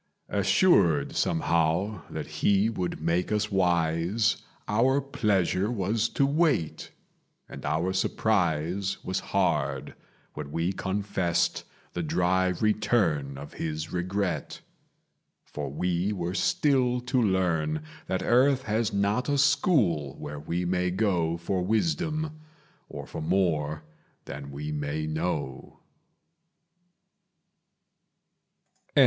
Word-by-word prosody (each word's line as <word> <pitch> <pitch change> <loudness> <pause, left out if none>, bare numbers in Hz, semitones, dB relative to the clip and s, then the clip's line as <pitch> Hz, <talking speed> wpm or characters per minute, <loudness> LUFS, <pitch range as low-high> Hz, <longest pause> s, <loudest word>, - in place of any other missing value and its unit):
Assured 95 - +3
somehow 85 +4 +1
that - - -5 0.2
he 100 +2 +3
would 90 -5 -3
make 85 +5 0
us 105 0 0
wise, 90 +3 +2 0.3
Our 125 +6 +3
pleasure 105 -7 +1
was 110 0 0
to 140 - +5
wait; 145 - +1 0.6
and - - -10
our 85 +4 0
surprise 95 -2 0
Was 95 - -1
hard - - 0 0.4
when 75 -1 -7
we 85 +4 0
confessed 95 -3 -1 0.3
the 85 - -2
dry 90 +3 +2
return 90 - +1
Of 70 +1 -9
his 80 0 -4
regret. 90 +1 -2 0.8
For - - -5
we 90 +6 -1
were 90 -2 -3
still 125 +2 +2
to 125 +1 +1
learn 85 -7 +1 0.2
That 95 0 -1
earth 130 +2 +4
has 110 0 0
not 100 +7 0
a 145 - +2
school 125 - +2
where 75 0 -6
we 85 +4 -2
may 90 0 +1
go 90 -4 +1
For 90 +2 -2
wisdom, 155 - -1 0.5
or - - -7
for - - -7
more 80 -3 0 0.4
than 70 0 -7
we 75 +2 -5
may 75 +1 -2
know. 75 -4 -3
95 Hz, 105 wpm, -27 LUFS, 80-110 Hz, 0.8 s, to